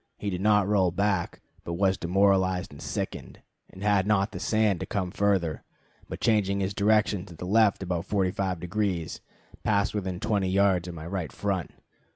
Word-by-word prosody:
He 100 - -3
did 90 0 -3
not 105 -1 +4
roll 100 -3 +3
back, 100 0 -1 0.2
but 85 - -4
was 95 +2 +2
demoralized 95 0 +2
and 70 - -12
sickened, - - -5 0.3
and 95 - -11
had 100 -2 +2
not 105 -1 +2
the - - -6
sand 110 -4 +1
to - - -5
come 95 -3 -2
further, 95 -6 0 0.5
but - - -6
changing 100 -3 +2
his 95 0 -1
direction 105 -1 +2
to 85 - -11
the 90 - -7
left 105 0 +3
about 90 -2 -2
forty 95 -3 +1
five 95 -2 -2
degrees, 90 -2 -2 0.4
passed 100 -2 +1
within 95 -4 -3
twenty 100 -3 0
yards 95 -2 +2
of 90 - -6
my 80 -1 -8
right 85 -2 -4
front. 95 -4 -2
95 Hz, 185 wpm, -27 LUFS, 90-100 Hz, 0.5 s, not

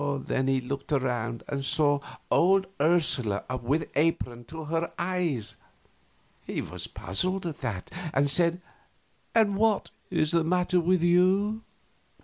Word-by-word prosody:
Then 130 0 0
he 135 0 +2
looked 140 +4 -5
around 120 -4 -1
and 140 -1 -3
saw 145 0 +2 0.3
old 190 +2 +4 0.2
Ursula 145 -10 +2 0.2
with 145 +7 +1
her - - -10
apron 125 -6 0
to 160 +5 -8
her 165 +2 -2
eyes. 170 - -1 0.9
He - - -4
was - - -5
puzzled 185 - -2
at 160 -4 -4
that, 110 -8 -4 0.2
and 145 -1 +2
said, 170 +4 +2 0.7
"And 210 -3 +4
what 220 -1 +2 0.2
is 155 - +1
the 170 -1 +3
matter 180 +2 +2
with 175 0 +2
you?" 190 +5 +3
160 Hz, 135 wpm, -28 LUFS, 135-180 Hz, 0.9 s, old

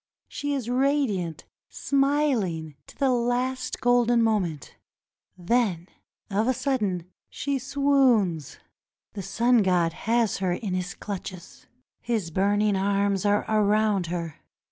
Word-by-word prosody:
She 290 0 -3
is 255 -5 -4
radiant, 245 - 0 0.2
smiling, 275 - 0
to - - -15
the 270 -2 +2
last 245 +2 -1
golden 240 -1 +3
moment 185 - -1 0.3
— - - -69 0.2
then, 185 -2 0 0.4
of 210 +4 +1
a 260 - +2
sudden, 215 -10 -1 0.2
she 280 -1 -2
swoons. 255 - +1 0.6
The 200 - -5
sun 235 +5 +2
god 175 -4 +2
has 230 +2 0
her 185 -2 0
in 190 +1 -4
his 180 -2 -3
clutches. 185 -2 -8 0.3
His 220 -8 -2
burning 205 +3 +2
arms 200 0 0
are 205 0 +2
around 210 -3 +2
her. 170 -2 -5
210 Hz, 120 wpm, -25 LUFS, 185-245 Hz, 0.6 s, golden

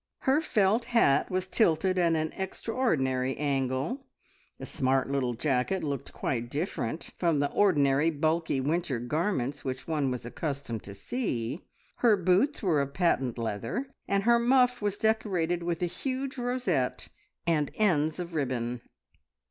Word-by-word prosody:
Her 275 +4 +3
felt 220 -5 +2
hat 230 - +3
was 185 0 -1
tilted 185 -2 +2
at 170 -2 +3
an 155 0 -1
extraordinary 155 - -1
angle; 140 - -1 0.5
the - - -7
smart 130 +1 0
little 130 -3 0
jacket 135 +8 0
looked 140 -4 -3
quite 120 -2 -2
different 150 - -3
from 170 -4 +2
the 145 0 0
ordinary 145 -6 +3
bulky 160 -1 0
winter 150 -1 0
garments 145 - -1
which 130 -1 -4
one 150 -4 0
was 125 -2 -4
accustomed 135 -4 -4
to 100 - -8
see; 140 - -3 0.3
her 225 -4 +4
boots 190 - +2
were 165 -7 +3
of 140 0 -4
patent 135 -9 +1
leather, 115 - -3 0.2
and 200 0 +1
her 235 +1 +5
muff 250 0 +3
was 205 -1 -1
decorated 185 -6 +1
with 170 0 -2
a - - +4
huge 265 +8 -3
rosette, 245 - -1 0.4
and 155 -4 +1
ends 160 -7 +2
of 175 -1 -5
ribbon. 125 -5 -2
160 Hz, 145 wpm, -29 LUFS, 135-205 Hz, 0.5 s, her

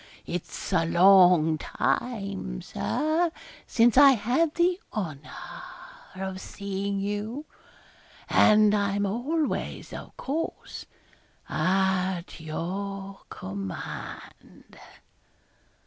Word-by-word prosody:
It's 180 +2 -5
a 165 -2 +4
long 175 -2 +6
time, 200 - -2
Sir, 320 +3 0 0.4
since 240 +2 +4
I 280 -1 +9
had 255 +8 +1
the 355 +2 +2
honour 155 -9 -5 0.9
of 190 0 -5
seeing 200 0 -4
you; 210 +8 -3 0.8
and 210 -1 +5
I'm 200 -1 +1
always, 275 +10 -2
of - - -9
course, 315 +5 -4 0.6
at 190 -2 0
your 195 +5 -5
command.' 95 0 -8
200 Hz, 80 wpm, -27 LUFS, 180-240 Hz, 0.9 s, I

